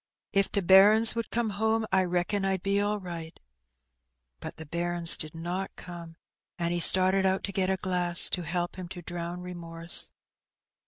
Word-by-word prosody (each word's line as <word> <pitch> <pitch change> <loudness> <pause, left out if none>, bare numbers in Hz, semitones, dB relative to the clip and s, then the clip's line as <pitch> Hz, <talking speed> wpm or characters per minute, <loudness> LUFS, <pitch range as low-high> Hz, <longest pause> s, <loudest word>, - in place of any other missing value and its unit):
If 195 -1 -1
t' 200 - -2
bairns 205 +5 +5
would 230 -1 -6
come 230 -2 -4
home, 220 +2 -2
I 190 -1 0
reckon 180 +3 -3
Fd 190 -1 -4
be 200 0 -1
all 205 +1 -3
right/' 170 -3 -10 1.0
But - - -11
the 160 - -11
bairns 170 +1 +3
did 155 +1 -10
not 175 +4 -7
come, 170 -2 -12 0.4
and 170 0 -4
he 175 - -3
started 185 +2 +4
out 190 0 -2
to 200 - -4
get 190 -1 -3
a 190 - -2
glass, 180 -2 +2
to 180 - -3
help 175 +1 -6
him 185 -1 -9
to 175 0 -11
drown 175 +1 -8
remorse. 170 -1 +3
180 Hz, 175 wpm, -25 LUFS, 175-195 Hz, 1.0 s, bairns